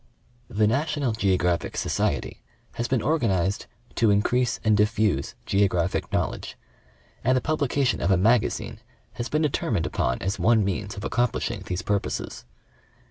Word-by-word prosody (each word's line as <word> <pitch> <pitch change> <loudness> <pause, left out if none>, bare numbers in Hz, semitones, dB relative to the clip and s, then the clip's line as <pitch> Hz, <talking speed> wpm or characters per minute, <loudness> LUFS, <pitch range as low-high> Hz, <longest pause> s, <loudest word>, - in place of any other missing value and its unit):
The 105 +1 +2
"National 140 +2 0
Geographic 95 -5 0
Society" - - -1 0.3
has 120 - -2
been 130 -4 0
organized 100 - 0
" 120 - -29
to 115 - +4
increase 120 +4 +2
and 110 -1 +4
diffuse 105 -7 +1
geographic 95 -3 +1
knowledge," - - -2 0.7
and 130 +1 +3
the - - +3
publi 150 0 -1
cation 140 -1 +1
of 85 - +1
a 95 - +4
Magazine 110 +4 +1 0.3
has 120 - -4
been 155 +1 +1
determined 150 - 0
upon 60 0 -1
as 95 +1 -2
one 110 -2 +4
means 100 +1 -3
of 100 - -6
accomplishing 120 0 -1
these 90 0 -3
purposes. 100 -9 -2
110 Hz, 145 wpm, -25 LUFS, 95-125 Hz, 0.7 s, to